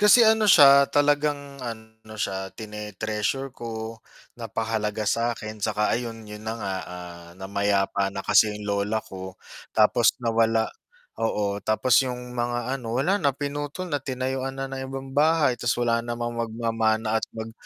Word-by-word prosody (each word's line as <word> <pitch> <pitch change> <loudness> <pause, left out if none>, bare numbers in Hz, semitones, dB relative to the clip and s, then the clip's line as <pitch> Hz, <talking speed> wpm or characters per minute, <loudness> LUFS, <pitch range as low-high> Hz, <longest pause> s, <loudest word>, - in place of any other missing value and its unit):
Kasi 210 +3 +7
ano 220 -1 +4
siya, 140 -5 +8
talagang 145 -1 +1
ano 110 -2 -9
siya, 95 -2 -2
tine-treasure 105 +4 -3
ko, 115 -2 -6 0.4
napakahalaga 110 -1 -2
sa'kin 110 -1 -1
'saka 105 0 +1
ayun, 115 -1 -3
'yun 105 0 -9
na 115 - -2
nga, 100 -4 -3
ah, 85 -1 -9
namayapa 100 0 0
na 100 0 -6
kasi 105 +1 +5
yung 105 - -8
lola 100 +2 0
ko 95 0 -8 0.4
tapos 110 +2 +4
nawala 115 -1 +3 0.6
oo, 105 -2 0
tapos 110 +4 +3
yung 125 0 -6
mga 120 0 -2
ano, 120 -4 -3
wala 185 +10 +2
na 140 -5 +1
pinutol 145 +4 -4
na 145 - +1
tinayuan 130 0 -3
na 135 - -3
ng 135 0 -5
ibang 135 0 -7
bahay, 150 -3 +3
ta's 120 +1 +1
wala 115 -1 +1
namang 120 0 -4
magmamana 110 -1 0
at - - -2
mag 110 0 -5
115 Hz, 150 wpm, -25 LUFS, 105-135 Hz, 0.6 s, siya